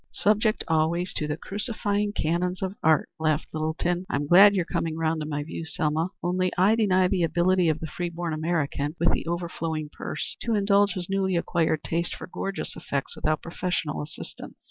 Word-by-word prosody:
"Subject 215 +1 +2
always 165 +3 +1
to 150 - -1
the 150 0 -2
crucifying 205 0 -2
canons 180 +1 -1
of 190 0 -2
art," 155 -1 +3
laughed 155 -1 +1
Littleton. 170 +3 -1
"I'm 145 -6 0
glad 195 +6 +8
you're 180 -3 +1
coming 160 -1 -2
round 160 0 0
to 150 - -3
my 145 -1 -2
view, 165 +2 -6
Selma. 160 +2 -1
Only 180 +1 +1
I 190 +4 +5
deny 190 -5 +3
the 185 -1 0
ability 175 +2 +3
of 155 0 0
the - - -4
free 175 +3 -3
born 170 -1 -3
American, 155 -2 -1
with 170 - +4
the - - -2
overflowing 165 -3 -3
purse, - - -5
to 230 -2 0
indulge 200 0 +3
his 180 -4 -4
newly 190 -1 0
acquired 165 -2 +1
taste 170 +1 -1
for - - -8
gorgeous 195 +2 -4
effects 140 -1 -3
without 155 0 -1
professional 170 -3 -2
assistance." 150 +1 -8
170 Hz, 185 wpm, -26 LUFS, 155-185 Hz, -, glad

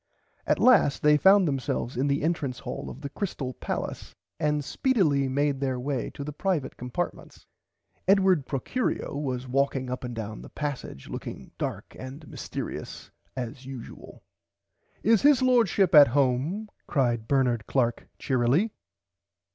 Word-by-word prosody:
At - - +3
last 225 - +4
they 150 0 +6
found 190 +4 +6
themselves 135 -3 -2
in 130 +4 +1
the 140 0 0
entrance 150 -6 -1
hall - - -6
of 135 - -10
the 140 - -5
Crystale 145 -10 -4
palace - - -5 0.2
and 150 -1 0
speedily 155 - +2
made 140 +1 +1
their 130 -2 -1
way 130 -1 -2
to 140 - -5
the 150 +1 -6
privite 155 -4 -1
compartments. 125 +8 -5 0.6
Edward 190 -7 +4
Procurio 185 - -2
was 130 -3 -3
walking 135 0 0
up 125 - -4
and 120 -1 -5
down 110 -1 -5
the - - -11
passage 145 - -5
looking - - -7
dark - - -4
and 135 +4 -8
mystearious - - -6 0.2
as 125 +1 -6
usual. 130 -4 -10 0.8
Is 225 -1 +4
His 285 -2 +5
Lordship 225 -7 +3
at 145 -2 +10
home 140 - +1 0.2
cried 120 -5 0
Bernard 125 -5 +1
Clark 120 -3 0
cheerily. 135 - +1
140 Hz, 140 wpm, -27 LUFS, 130-170 Hz, 0.8 s, at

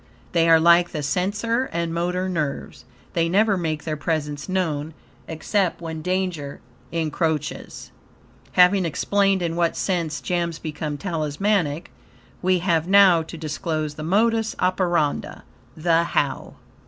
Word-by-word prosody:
They 165 -2 +3
are 165 0 +7
like 170 +1 +5
the 150 -2 -3
sensor 210 - 0
and 170 -1 -2
motor 180 +2 -1
nerves 155 -6 -4 0.3
they 165 -1 +1
never 205 +3 +3
make 160 -4 -2
their 155 -2 -2
presence 150 0 -3
known, 160 -5 -2 0.3
except, 180 +3 -1
when 160 -2 -6
danger 180 -5 -2 0.3
encroaches. 160 -2 -3 0.6
Having 180 +1 +5
explained 195 +3 +1
in 165 -1 -2
what 170 -1 0
sense 170 -6 -1
gems 170 -2 -2
become 150 -2 -5
talismanic, 165 0 -1 0.5
we 185 0 +3
have 170 -2 0
now 190 -3 +6
to 165 +1 -9
disclose 155 0 -3
the 155 - -9
modus 220 +6 +1
operandi 175 -5 0 0.4
THE 165 +1 +3
HOW. 145 -4 -2
170 Hz, 130 wpm, -23 LUFS, 155-185 Hz, 0.6 s, are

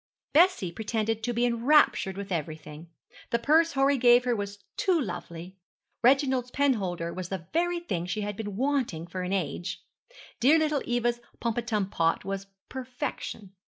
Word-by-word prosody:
Bessie 310 - +4
pretended 220 +3 -2
to 240 +2 -1
be 240 +1 +1
enraptured 235 -5 +3
with 200 -1 -6
everything. 155 -1 -5 0.4
The 235 - +2
purse 315 +7 +3
Horry 275 0 +3
gave 245 0 +6
her 245 -1 +2
was 200 -1 -5
'too 370 -4 +2
lovely.' 175 - -6 0.4
Reginald's 260 0 +3
penholder 195 -12 0
was 185 -1 -5
the 190 -4 -5
very 350 +1 +1
thing 175 - -3
she 210 +4 -2
had 205 0 -3
been 205 -2 -5
wanting 255 - 0
for 185 +2 -5
an 180 +1 -3
age. 175 -2 -3 0.6
Dear 280 +7 +6
little 305 -3 +1
Eva's 240 0 0 0.2
pomatum 225 -4 -1
pot 165 +2 +1
was 195 0 -4 0.2
perfection. 250 -6 -5
225 Hz, 155 wpm, -28 LUFS, 185-265 Hz, 0.6 s, gave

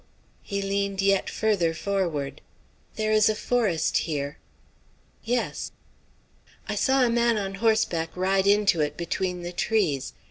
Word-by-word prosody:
He 200 0 -3
leaned 200 0 -1
yet 195 0 +2
further 190 -7 +1
forward. 170 -8 -2 0.5
"There 215 0 0
is 215 0 +5
a 215 - +1
forest 210 -9 +1
here." 145 -2 -3 0.8
"Yes." 240 +1 -2 0.9
"I - - -2
saw 265 -1 +3
a - - +1
man 235 -1 +2
on 195 -2 -3
horseback 220 -8 +2
ride 190 +1 +2
into 200 -5 +4
it 150 0 -1
between 180 +1 -2
the 175 - -4
trees. 180 - 0
195 Hz, 135 wpm, -26 LUFS, 170-215 Hz, 0.9 s, is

